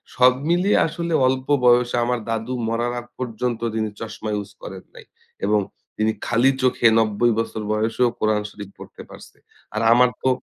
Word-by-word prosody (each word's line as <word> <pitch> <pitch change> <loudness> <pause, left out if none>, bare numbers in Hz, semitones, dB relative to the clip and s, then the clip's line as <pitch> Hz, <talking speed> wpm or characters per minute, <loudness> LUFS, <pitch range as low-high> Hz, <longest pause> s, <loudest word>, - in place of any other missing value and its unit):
সব 125 0 +6 0.2
মিলিয়ে 180 +4 +3
আসলে 170 +1 -4
অল্প 130 0 -1 0.2
বয়সে 120 0 +4
আমার 125 0 0
দাদু 115 +2 -2
মরার 120 +1 -1
আগ 120 - -11
পর্যন্ত 120 -1 -3 0.2
তিনি 110 -1 -1
চশমা 110 -1 -6
ইউজ 100 -1 -5
করেন 95 -1 -9
নাই - - -13 0.4
এবং 105 0 +3 0.4
তিনি 110 +1 +1
খালি 120 +4 +3
চোখে 125 -2 +3
৯০ 110 +2 +2
বছর 110 -1 -3
বয়সেও 115 +3 +1
কোরআন 110 -1 +1
শরীফ 100 -2 -10
পড়তে - - -11
পারছে। - - -14 0.4
আর 110 - 0
আমার 125 +1 +5
তো 130 - +2
120 Hz, 165 wpm, -22 LUFS, 110-125 Hz, 0.4 s, সব